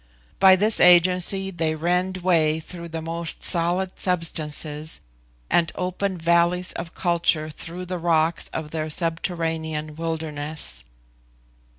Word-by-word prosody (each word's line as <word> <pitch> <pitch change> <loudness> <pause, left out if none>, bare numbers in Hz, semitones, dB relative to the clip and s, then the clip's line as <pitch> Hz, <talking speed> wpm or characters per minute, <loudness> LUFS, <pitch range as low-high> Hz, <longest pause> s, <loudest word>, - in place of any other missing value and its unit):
By 190 -1 +8
this 210 +4 +2
agency 180 +2 +4
they 160 -3 -1
rend 180 +3 0
way 160 -4 +3
through 170 +1 -8
the 160 0 -5
most 165 0 -3
solid 180 +2 -1
substances, 155 -3 -2 0.5
and 165 -2 +2
open 185 +1 -2
valleys 170 +2 +2
for 165 - -3
culture 165 -2 0
through 175 +4 -7
the 180 0 -4
rocks 165 -1 +1
of 155 -1 -6
their 155 -1 -3
subterranean 160 -2 -2
wilderness. 155 - -4
170 Hz, 115 wpm, -23 LUFS, 160-180 Hz, 0.5 s, By